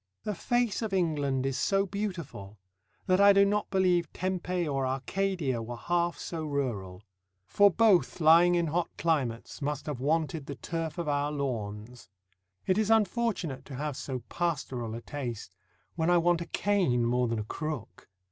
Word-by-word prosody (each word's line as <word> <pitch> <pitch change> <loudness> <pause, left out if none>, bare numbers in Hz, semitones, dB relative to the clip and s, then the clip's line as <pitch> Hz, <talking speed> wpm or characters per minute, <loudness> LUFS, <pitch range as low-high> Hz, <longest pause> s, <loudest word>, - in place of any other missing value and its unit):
The 210 - -2
face 240 +2 0
of 220 -3 -3
England 145 -7 0
is 135 -1 -1
so 195 +6 +2
beautiful, 170 - -5 0.5
that 185 +1 +3
I 200 0 +8
do 200 0 +6
not 205 +1 0
believe 185 -3 +2
Tempe 180 -1 -2
or 135 -2 -1
Arcadia 135 0 -1
were 120 +1 -6
half 175 +4 0
so 165 -2 -5
rural; 115 -11 -3 0.4
for 205 - +5
both 200 -3 +3
lying 170 +2 +6
in 170 -1 +2
hot 170 +2 -1
climates, 140 -7 -1
must 145 0 -2
have 145 -5 -4
wanted 155 +1 -1
the 140 - -5
turf 165 -1 -4
of 170 -2 -3
our 145 0 0
lawns. 115 -6 -5 0.6
It 190 +3 +2
is 215 -1 +1
unfortunate 210 - +1
to 135 - -8
have 145 +1 -3
so 130 -2 -5
pastoral 130 -9 -2
a 115 - -6
taste, 125 -7 -6 0.4
when 165 0 0
I 175 - +5
want 170 0 +2
a 170 - -5
cane 180 -13 +1
more 125 +1 +1
than 115 0 -1
a 110 - -2
crook. 150 0 -6
155 Hz, 165 wpm, -29 LUFS, 130-185 Hz, 0.6 s, I